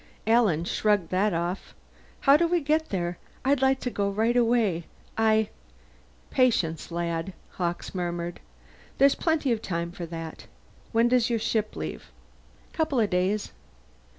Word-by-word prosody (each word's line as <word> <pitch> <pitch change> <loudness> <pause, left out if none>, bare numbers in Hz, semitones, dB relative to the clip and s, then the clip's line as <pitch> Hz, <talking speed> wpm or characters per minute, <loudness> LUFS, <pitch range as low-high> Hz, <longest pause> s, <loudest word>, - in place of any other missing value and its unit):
Alan 220 -8 +3
shrugged 205 -2 +1
that 195 +3 +2
off. 175 +2 -3 0.5
"How 275 0 +6
do 335 +3 +3
we 350 +1 +2
get 310 +1 0
there? 175 -2 -2 0.3
I'd 275 0 +3
like 265 0 +3
to 250 - -2
go 200 -2 0
right 220 +4 +1
away. 230 -8 +2 0.3
I 220 -1 +3 0.4
" - - -31
"Patience, 200 -11 +1
lad," 170 +1 -2 0.2
Hawkes 175 -1 -3
murmured. 175 -1 -3 0.6
"There's 275 +1 +6
plenty 315 -5 0
of 225 -2 0
time 170 -3 -3
for 175 -1 -7
that. 165 -1 -7 0.4
When 230 +1 +4
does 245 -1 +3
your 235 - +1
ship 220 -1 -1
leave?" 80 -5 -6 0.6
"Couple 310 -5 0
of 215 -3 +1
days." 190 +3 0
210 Hz, 150 wpm, -27 LUFS, 175-245 Hz, 0.6 s, How